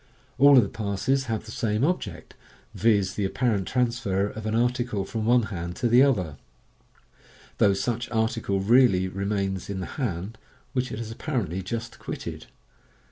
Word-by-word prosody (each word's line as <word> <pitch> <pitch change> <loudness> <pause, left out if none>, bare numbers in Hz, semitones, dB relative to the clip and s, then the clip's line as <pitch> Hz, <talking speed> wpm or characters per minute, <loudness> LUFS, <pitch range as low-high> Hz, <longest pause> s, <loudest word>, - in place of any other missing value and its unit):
All 140 0 +8
of 125 - +7
the - - -2
passes 110 +7 -1
have 110 -3 -3
the 110 - -9
same 110 +1 -1
object 105 - -2 0.2
— - - -32
viz., 105 -4 +2
the 105 - -2
apparent 100 -1 0
transfer 115 -6 0
of 110 +1 -5
an 110 - 0
article 120 -4 0
from 110 0 -3
one 120 +1 +4
hand 85 0 -4
to 120 - 0
ihe 125 - +8
other, 90 - +1 1.2
though 100 -2 +4
such 120 +3 -2
article 110 -3 0
really 105 -4 +4
remains 100 0 -2
in 100 -1 -3
the 95 - -3 0.2
hand 100 -1 -3 0.3
which 125 -1 -1
it - - -4
has 115 -1 -5
apparently 115 - -3
just 115 +4 -5
quitted. - - -6
110 Hz, 165 wpm, -26 LUFS, 95-120 Hz, 1.2 s, All